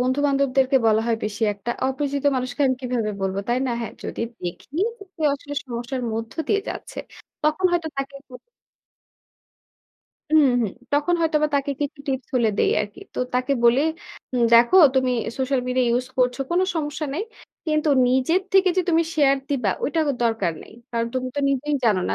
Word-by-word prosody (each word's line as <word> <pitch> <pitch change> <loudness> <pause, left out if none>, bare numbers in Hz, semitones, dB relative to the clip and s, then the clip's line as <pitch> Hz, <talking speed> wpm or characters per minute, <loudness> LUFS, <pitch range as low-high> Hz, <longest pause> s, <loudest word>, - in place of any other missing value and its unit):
বন্ধু-বান্ধবদেরকে 270 0 +2
বলা 220 0 +4
হয় 230 - +1
বেশি 215 +1 -4
একটা। 205 +4 -5 0.2
অপরিচিত 280 +1 -2
মানুষকে 255 +1 -4
আমি 260 - +2
কিভাবে 245 -4 -1
বলব, 190 0 -1
তাই 240 - +2
না? 250 - -1
হ্যাঁ, 230 - -5
যদি - - -5 0.2
দেখি 175 -1 -6 0.3
যে - - -9
কেউ 315 -3 +1
আসলে 290 +1 -8
সমস্যার 245 +1 -4
মধ্য 225 0 -4 0.2
দিয়ে 415 - +2
যাচ্ছে। - - -7 0.4
তখন 310 +5 0
হয়তো 340 -2 0
তাকে 275 0 -4
বল 250 - -11 2.0
উমহু। 250 -6 +4 0.3
তখন 295 +5 +2
হয়তো 320 -1 +2
বা 305 - +3
তাকে 280 0 -1
কিছু 290 0 -3
টিপস 265 -2 -2
হলেও 235 -4 +2
দেই - - +3
আরকি। 205 -1 -6
তো - - -5 0.2
তাকে 255 +2 +1
বলি, 235 +3 +5 0.5
"উম 245 - +2
দেখো 235 +10 +6 0.2
তুমি 260 -1 +2 0.3
সোশ্যাল 265 0 +1
মিডিয়া 250 0 +1
ইউজ 250 +1 0
করছ। 250 -1 +2
কোনো 355 +2 +3
সমস্যা 305 -1 -2
নাই। 350 - -1 0.4
কিন্তু 305 0 +1 0.2
নিজের 265 +9 +2
থেকে 385 -1 +5
যে 370 - +3
তুমি 330 -1 +4
শেয়ার 275 -3 +4
দিবা 245 -9 +1
ওইটা 320 +3 0 0.2
দরকার 225 -7 +1
নেই। - - -15 0.2
কারণ 230 -1 -1
তুমি 255 0 -1
তো 285 - +1
নিজেই 275 +2 0
জানো 210 -5 +3
না - - 0
260 Hz, 175 wpm, -23 LUFS, 240-295 Hz, 2.0 s, দেখো